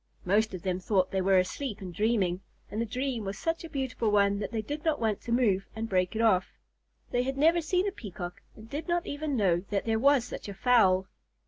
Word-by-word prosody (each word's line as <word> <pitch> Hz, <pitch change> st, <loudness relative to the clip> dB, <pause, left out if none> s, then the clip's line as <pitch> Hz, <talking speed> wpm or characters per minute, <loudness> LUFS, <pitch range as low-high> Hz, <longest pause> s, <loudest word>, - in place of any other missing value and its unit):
Most 205 Hz, +2 st, +2 dB
of 175 Hz, -, -8 dB
them 185 Hz, -1 st, -1 dB
thought 185 Hz, -1 st, +1 dB
they 190 Hz, -, 0 dB
were 190 Hz, 0 st, +4 dB
asleep 205 Hz, +5 st, -1 dB
and 185 Hz, -2 st, -7 dB
dreaming, 195 Hz, -3 st, +1 dB, 0.3 s
and 215 Hz, -, -2 dB
the 230 Hz, -, -1 dB
dream 250 Hz, 0 st, -2 dB
was 195 Hz, 0 st, -4 dB
such 330 Hz, 0 st, -2 dB
a 330 Hz, -, -7 dB
beautiful 265 Hz, -6 st, -1 dB
one 200 Hz, -1 st, +3 dB
that 205 Hz, -, -4 dB
they 220 Hz, -2 st, -2 dB
did 295 Hz, +7 st, -5 dB
not 315 Hz, -2 st, +1 dB
want 220 Hz, -3 st, 0 dB
to 235 Hz, -, -6 dB
move 215 Hz, -6 st, +2 dB
and 225 Hz, +1 st, -3 dB
break 185 Hz, -1 st, 0 dB
it 225 Hz, -, +1 dB
off. 190 Hz, -5 st, +2 dB, 0.5 s
They 245 Hz, -, +2 dB
had 270 Hz, +2 st, -2 dB
never 330 Hz, +4 st, +4 dB
seen 360 Hz, +5 st, +1 dB
a -, -, 0 dB
Peacock 180 Hz, -, -7 dB
and 220 Hz, +1 st, -12 dB
did 290 Hz, +9 st, -5 dB
not 345 Hz, 0 st, 0 dB
even 290 Hz, -1 st, -2 dB
know 185 Hz, -5 st, +3 dB
that 200 Hz, -2 st, -1 dB
there 225 Hz, -1 st, +1 dB
was 280 Hz, 0 st, +4 dB
such 245 Hz, -, -7 dB
a 200 Hz, -, -7 dB
fowl. 190 Hz, -6 st, +4 dB
220 Hz, 235 wpm, -29 LUFS, 195-270 Hz, 0.5 s, were